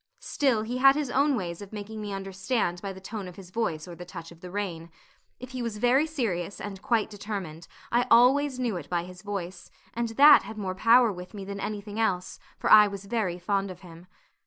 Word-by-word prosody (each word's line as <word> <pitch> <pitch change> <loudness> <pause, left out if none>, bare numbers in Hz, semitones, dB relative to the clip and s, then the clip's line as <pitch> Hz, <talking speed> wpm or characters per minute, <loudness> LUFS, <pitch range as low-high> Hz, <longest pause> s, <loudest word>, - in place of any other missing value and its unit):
Still, 265 - +1
he 245 +3 -3
had 270 +1 +7
his 290 -4 -2
own 280 +2 +3
ways 175 -5 -4
of 200 - -10
making 215 +1 -7
me 205 -1 -5
understand 195 -1 -2
by 195 - -4
the 190 - -10
tone 195 0 -6
of 180 - -10
his 185 -2 -12
voice 180 -8 -2
or 175 - -8
the 175 +1 -9
touch 170 -2 -9
of 170 -1 -16
the 180 - -8
rein. 175 -4 -4 0.5
If 255 +1 -9
he 255 -1 -4
was 230 -3 -3
very 250 +7 +3
serious 205 - -3
and 195 -2 -7
quite 230 -4 +1
determined, 195 -6 -6 0.2
I 240 +1 +2
always 260 +3 +5
knew 240 -7 -1
it 150 -4 -9
by 175 -1 0
his 180 0 -11
voice, 190 -3 -6 0.2
and 235 0 -2
that 290 +2 +9
had 220 - -9
more 190 -3 -3
power 230 +4 +5
with 180 +3 -10
me 200 -1 -6
than 200 0 -6
anything 210 +1 -5
else, 185 -5 -1 0.2
for - - -1
I 210 -1 +9
was 200 -1 -7
very 200 -5 -1
fond 195 +2 -1
of 185 -1 -10
him. 175 -1 -13
205 Hz, 225 wpm, -27 LUFS, 180-235 Hz, 0.5 s, that